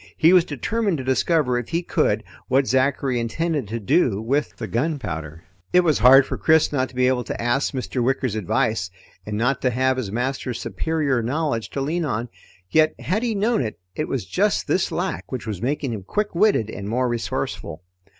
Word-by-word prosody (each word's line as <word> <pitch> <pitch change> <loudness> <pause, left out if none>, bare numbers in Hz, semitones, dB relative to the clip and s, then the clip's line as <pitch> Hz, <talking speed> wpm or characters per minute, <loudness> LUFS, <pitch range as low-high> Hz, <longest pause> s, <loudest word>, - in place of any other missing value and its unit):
He 165 +3 +5
was 180 -2 +6
determined 195 - -1
to 130 - -5
discover 130 0 +1
if 120 - -7
he 170 +2 -1
could - - +1 0.2
what 135 +1 +3
Zachary 130 0 +1
intended 145 +2 -1
to 115 +3 -4
do 120 - +2
with 135 +7 -1
the 115 - -5
gunpowder. 100 - -3 0.3
It 180 - +7
was 155 -7 +2
hard 130 +4 +8
for - - -5
Chris 160 -1 +4
not 130 -2 0
to - - -17
be 125 0 +2
able 125 -1 +1
to - - -5
ask 120 +4 +1
Mr. 130 -2 -2
Wicker's 130 -2 0
advice 110 -1 0 0.4
and 105 0 -3
not 125 +5 +1
to 130 - +2
have 130 +2 +1
his 115 -7 -3
master's 125 +1 -2
superior 150 -6 -1
knowledge 130 -1 -1
to 140 - -4
lean 165 +5 -1
on. 120 -4 -2 0.4
Yet 155 0 +3
had 200 +6 -1
he 235 -3 -1
known 220 +4 +1
it, 110 -4 -4 0.2
it - - -2
was - - -3
just - - 0
this - - +1
lack 95 - -3
which 130 -4 -4
was 105 -4 -4
making 135 0 -1
him 105 - -5
quick 205 - -2
witted 170 - +2
and 100 +1 -6
more 125 +3 +1
resourceful. 115 -7 -3
130 Hz, 200 wpm, -23 LUFS, 115-155 Hz, 0.4 s, hard